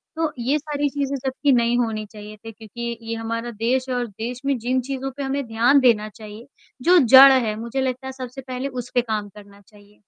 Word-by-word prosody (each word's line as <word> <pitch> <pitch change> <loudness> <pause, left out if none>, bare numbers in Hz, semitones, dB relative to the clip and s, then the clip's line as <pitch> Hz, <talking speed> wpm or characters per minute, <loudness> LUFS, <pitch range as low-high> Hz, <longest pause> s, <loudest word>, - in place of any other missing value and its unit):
तो 320 -1 -1
ये 260 +5 +1
सारी 290 -1 -2
चीज़ें 280 0 -2
जबकि 270 +2 0
नहीं 240 0 +2
होनी 220 -3 -2
चाहिए 210 0 -12
थी 225 - -7
क्योंकि 235 +2 -7
ये 230 - -2
हमारा 230 +1 -4
देश 240 +4 -1
है 255 - -1
और 245 -1 -2
देश 230 +4 -7
में 275 -1 +1
जिन 255 +3 0
चीज़ों 270 0 -4
पे 285 - -3
हमें 275 0 -2
ध्यान 235 +5 +3
देना 225 -5 +3
चाहिए 215 +3 -12 0.3
जो 355 +6 +5
जड़ 270 0 +9
हैं 235 -5 +1
मुझे 235 +4 -4
लगता 260 0 -3
है - - -4
सबसे 260 0 -8
पहले 255 +1 -5
उस 250 -3 -6
पे 245 - +4
काम 215 -3 -4
करना 200 0 -16
चाहिए। 205 0 -22
245 Hz, 220 wpm, -22 LUFS, 220-265 Hz, 0.3 s, जड़